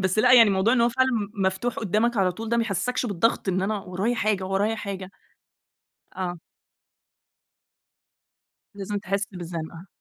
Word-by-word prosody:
بس 185 +2 0
لأ، 250 +3 +5
يعني 230 -4 +8
موضوع 195 +4 +2
إن 245 - +3
هو 235 - +4
فعلًا 260 +2 +1
م 210 -3 -2 0.2
مفتوح 190 +6 -1
قُدّامك 220 +3 0
على 185 -2 +2
طول 225 +4 -7
ده 235 - +1
ما 230 - +2
يحسّسكش 245 +5 -1
بالضغط؟ 205 +1 0
إن 185 0 +1
أنا 210 +1 -1
ورايا 195 +6 -2
حاجة، 210 -4 0
ورايا 205 +4 0
حاجة. 195 -2 -6 1.0
آه. 180 -2 -4 2.4
لازم 205 +1 -4
تحِسّ 200 0 -2
بالزَّنقة. 170 0 -7
200 Hz, 155 wpm, -25 LUFS, 190-225 Hz, 2.4 s, يعني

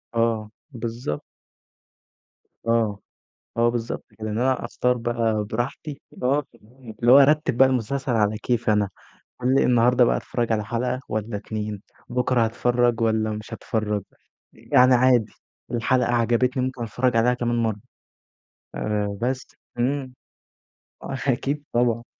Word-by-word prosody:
آه، 115 -2 0 0.2
بالضبط. 115 - -4 1.5
آه، 110 -3 +1 0.6
آه، 115 0 +4
بالضبط 120 -1 -3
كده 110 0 -4
إن 105 - -2
أنا 130 0 +1
أختار 125 +1 0
بقى 115 -2 0
براحتي 125 +7 -4 0.2
آه، 140 +4 +2 0.6
اللي 120 +1 +5
هو 140 - +10
ارتّب 150 -2 +4
بقى 135 +1 +6
المسلسل 130 +1 -1
على 105 -1 +1
كيفي 120 -1 0
أنا، 105 -1 +2 0.5
قال 125 +1 +2
لي 135 - +4
النهارده 125 +1 +4
بقى - - +2
اتفرّج 120 -2 -2
على 105 -1 0
حلقة 125 +4 -2
والّا 110 0 -3
2 105 -1 -5 0.3
بكرة 125 -1 +1
هاتفرّج 120 +1 +1
والّا 110 -1 +1
مش 105 +1 -6
هاتفرّج، 105 -2 -2 0.5
يعني 125 +3 +4
عادي 125 -3 +3 0.4
الحلقة 125 +1 +1
عجبتني 120 +2 +2
ممكن 130 -1 -3
اتفرّج 120 +2 0
عليها 125 +2 +4
كمان 120 -1 -1
مرّة 110 -2 -1 1.0
آآ، 105 -1 -2
بس 130 +2 -1 0.3
إمم، 130 +1 -1 0.9
آه 135 - -4
أكيد 140 +3 0
طبعًا. 120 -1 +1
120 Hz, 130 wpm, -24 LUFS, 110-125 Hz, 1.5 s, هو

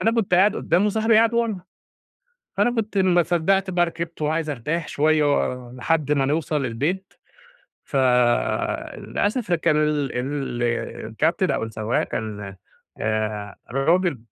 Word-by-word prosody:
فأنا 225 - +2
كنت 220 -6 +1
قاعد 195 +4 +4
قدّام 180 +5 +2
وصاحبي 220 +2 +2
قاعد 230 +1 +4
ورا، 230 -5 0 1.0
فأنا - - +3
كنت 215 -2 -1
ما 180 -2 +4
صدقت 180 +4 +1
بقى 175 -1 +2
ركبت 170 -1 -6
وعايز 155 +1 0
أرتاح 150 +5 -3
شوية 155 +1 +2
و 125 -1 -2
لحد 150 +3 0
ما 140 -2 +2
نوصل 150 -1 0
البيت، 155 +12 -2 0.7
ف - - -9 1.0
للأسف 205 -2 -1
كان 160 -2 +2
ال 150 -3 +1
ال 135 -2 -3 0.4
الكابتن 155 - 0
أو - - -1
السواق 110 +1 -1
كان، 105 -3 -5 0.5
آآ 110 -2 -2 0.2
راجل 160 +3 +2
155 Hz, 135 wpm, -23 LUFS, 130-185 Hz, 1.0 s, قاعد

